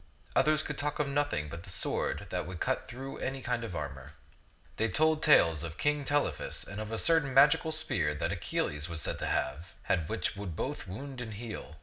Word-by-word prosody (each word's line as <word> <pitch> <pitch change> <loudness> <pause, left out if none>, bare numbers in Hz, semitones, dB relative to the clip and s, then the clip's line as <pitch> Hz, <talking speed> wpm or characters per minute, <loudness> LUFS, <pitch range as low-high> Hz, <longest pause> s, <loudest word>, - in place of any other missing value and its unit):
Others 155 0 +4
could 150 - -4
talk 145 0 -1
of 150 - +1
nothing 140 - 0
but 85 +3 -7
the 95 - -10
sword 85 - 0
that - - -2
would 90 -2 -6
cut - - 0
through 135 +3 -7
any 135 0 -3
kind 120 -1 -1
of 110 -6 -5
armor. 70 -4 -5 0.6
They 110 +1 +1
told 155 +2 +3
tales 85 - +5
of 85 0 -6
King 150 -1 +1
Telephus 145 +1 0
and 100 +2 -6
of 110 0 -5
a 115 - -1
certain 160 -4 +3
magical 150 +3 +6
spear 155 - 0
that - - -1
Achilles 75 +3 -1
was 85 -1 -3
said - - -1
to - - -2
have 75 +7 -2
had 80 -3 0
which - - -1
would 95 -5 -5
both 135 - -3
wound 130 +7 -6
and 110 -3 -6
heal. 110 -7 -7
115 Hz, 210 wpm, -31 LUFS, -, 0.6 s, magical